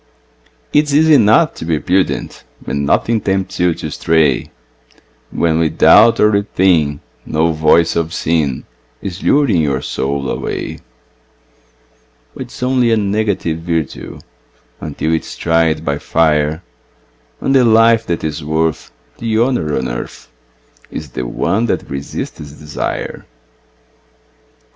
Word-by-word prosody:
It 150 +1 +4
is 145 -1 -1
easy 160 +1 +5
enough 140 +5 +4
to - - -9
be 80 -1 0
prudent 95 +3 -1 0.2
When 70 +1 -2
nothing 110 +9 +1
tempts 95 -1 -2
you 90 -2 +2
to 80 -2 -6
stray, 80 -4 +1 0.8
When 80 -1 0
without 105 +7 +5
or 105 - +4
within 90 -7 +1 0.2
no 80 +2 0
voice 80 +1 +3
of 85 -1 -1
sin 80 -5 -1 0.3
Is 95 -1 -6
luring 135 - +3
your 70 -3 -1
soul 70 0 -2
away; - - -4 1.5
But 130 - -7
it's 125 - -9
only 125 -2 +2
a 115 - +3
negative 100 -5 -1
virtue 80 -3 -4 0.6
Until 80 +1 -3
it 80 - +1
is - - -10
tried 80 -1 +1
by 70 0 -1
fire, 80 0 +1 0.8
And 135 - 0
the 130 -2 +5
life 115 0 +4
that 85 -1 -2
is 75 -2 -3
worth 80 +1 -1 0.3
the 115 -1 -1
honour 115 - 0
on 65 -1 -2
earth - - -7 0.6
Is - - -7
the 60 - -4
one 105 - 0
that - - -2
resists 70 0 -5
desire. 75 0 -6
85 Hz, 130 wpm, -16 LUFS, 75-110 Hz, 1.5 s, easy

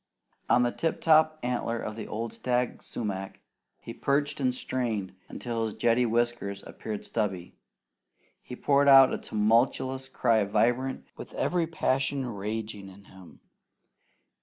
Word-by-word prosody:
On 125 - +5
the 120 - +1
tip 165 +5 -2
top 155 -1 +4
antler 120 -1 -1
of 110 - -5
the 115 - -6
old 115 +2 -4
stag 125 -1 -1
sumac, 95 -4 -5 0.4
he 115 - -8
perched 145 +4 0
and 130 -2 +2
strained 120 -6 -3 0.2
until 115 -2 -3
his 110 - -5
jetty 120 +1 +2
whiskers 115 -4 -1
appeared 105 -2 -6
stubby. 95 -6 -3 0.9
He 125 - -9
poured 140 +2 +2
out 135 -1 +8
a - - -2
tumultuous 125 +5 +1
cry 115 -5 +2
vibrant 120 +6 0
with - - -9
every 175 -2 0
passion 135 -3 0
raging 105 -2 -5
in 95 +1 -15
him. 95 -2 -16
120 Hz, 135 wpm, -28 LUFS, 105-130 Hz, 0.9 s, out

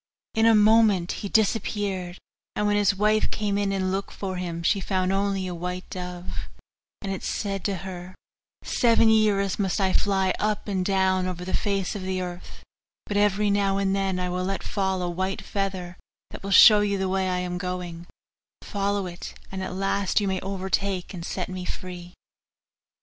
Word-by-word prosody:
In 225 0 +3
a 225 - +6
moment 210 -4 +5
he 200 - -5
disappeared, 200 -4 0 0.4
and 210 - 0
when 205 0 +2
his 205 -1 +3
wife 215 +2 +2
came 205 -2 -1
in 200 -1 0
and 190 -1 0
looked 195 +1 -2
for 190 -2 -4
him, 170 -2 -4
she 200 +4 +3
found 185 0 0
only 195 -1 0
a 180 - -4
white 180 +2 -5
dove; 180 -1 -6 0.5
and 195 -1 -2
it 190 - -5
said 195 -2 -3
to 200 - 0
her, 185 0 -7 0.5
'Seven 230 -2 +4
years 210 -3 +3
must 195 0 0
I 190 -1 +2
fly 190 -2 +2
up 210 0 -1
and 190 -3 0
down 190 -1 +2
over 180 -1 -5
the 185 - -4
face 200 -1 0
of 205 - -4
the 185 0 -2
earth, 180 -1 -7 0.4
but 205 - -4
every 205 0 +3
now 200 -1 +2
and 195 -1 +1
then 195 -2 0
I 180 - -1
will 180 +1 -2
let 195 +1 -2
fall 190 -2 -1
a - - -1
white 190 +3 -2
feather, 190 -3 -3 0.3
that - - -9
will 195 - -5
show 210 +2 +9
you 205 -1 +1
the 190 0 -1
way 190 0 0
I 180 - 0
am 180 0 -3
going; 180 -2 -5 0.6
follow 200 -1 -1
it, 175 -1 -8 0.2
and 190 0 -4
at 185 -1 -4
last 195 +1 +1
you 205 - -1
may 190 -1 0
overtake 190 0 -2
and 175 -2 -6
set 180 +1 -3
me 185 -1 -5
free. 180 -1 -7
190 Hz, 190 wpm, -25 LUFS, 185-200 Hz, 0.6 s, show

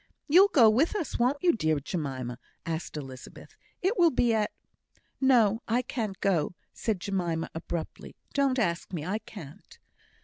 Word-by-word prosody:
"You'll 360 +7 +7
go 255 - +6
with 255 - +3
us, 335 -12 -3
won't 260 +6 +1
you, 355 - +6
dear 155 -8 +1
Jemima?" 135 -6 -4 0.3
asked 160 -1 -4
Elizabeth; 130 -3 -10 0.3
"it 390 +4 +1
will 340 -1 +7
be 245 -4 +2
at 215 -1 +1 0.4
" - - -50 0.3
"No! 235 -5 +4
I 240 +2 +1
can't 215 -6 -4
go!" 180 -4 +1 0.2
said 215 -5 -2
Jemima, 175 -4 -2
abruptly. 165 0 -6 0.2
"Don't 275 -2 +2
ask 175 -8 -1
me 160 -5 -4
I 200 +5 -1
can't." 160 -11 -12
205 Hz, 160 wpm, -28 LUFS, 165-255 Hz, 0.4 s, You'll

